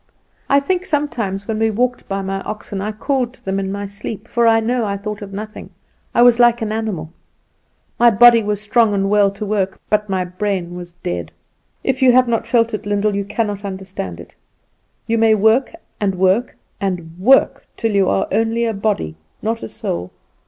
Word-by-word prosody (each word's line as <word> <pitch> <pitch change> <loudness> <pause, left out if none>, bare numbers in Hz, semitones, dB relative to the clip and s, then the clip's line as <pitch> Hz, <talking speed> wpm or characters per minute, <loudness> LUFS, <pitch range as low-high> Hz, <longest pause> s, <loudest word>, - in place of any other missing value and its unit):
I 280 - +5
think 360 +6 -1
sometimes 240 - -2
when 220 0 -2
I 225 - +3
walked 245 +3 -1
by 195 0 -2
my 195 0 -3
oxen 205 -1 -5
I 210 +2 -2
called 250 +2 -2
to - - -28
them 195 0 -1
in 195 0 -3
my 200 0 -4
sleep, 205 +2 -7
for 235 -1 +2
I 225 0 +5
know 240 +2 0
I 200 -2 -2
thought 210 +1 -6
of 200 -1 -8
nothing; 215 +2 -7 0.5
I 240 - +6
was 245 -1 +6
like 240 0 +5
an 215 - -2
animal. 200 -8 -3 0.9
My 240 - +7
body 235 +1 +7
was 210 -1 -2
strong 215 0 +2
and 195 0 0
well 205 -1 +4
to 200 +2 -6
work, 195 -2 -1
but 210 -1 +1
my 185 -1 0
brain 180 -1 -3
was 175 -1 -8
dead. 85 -2 -3 0.5
If 265 0 -1
you 260 -1 +7
have 255 0 +5
not 230 -1 -1
felt 230 -2 +2
it, 210 -1 -4
Lyndall, 205 0 +1
you 200 0 -2
cannot 210 -1 -2
understand 190 - -6
it. 85 - -12 0.7
You 230 0 0
may 220 -1 +5
work, 220 +5 +3 0.3
and 200 -3 0
work, 190 +6 +1 0.2
and 180 -5 -3
work, 265 +8 +3
till 225 -1 0
you 200 -2 +2
are 195 - +1
only 225 +3 +1
a 225 - -1
body, 195 - -2 0.3
not 225 +2 -1
a 110 - -6
soul. 90 +1 -4
210 Hz, 200 wpm, -19 LUFS, 195-230 Hz, 0.9 s, My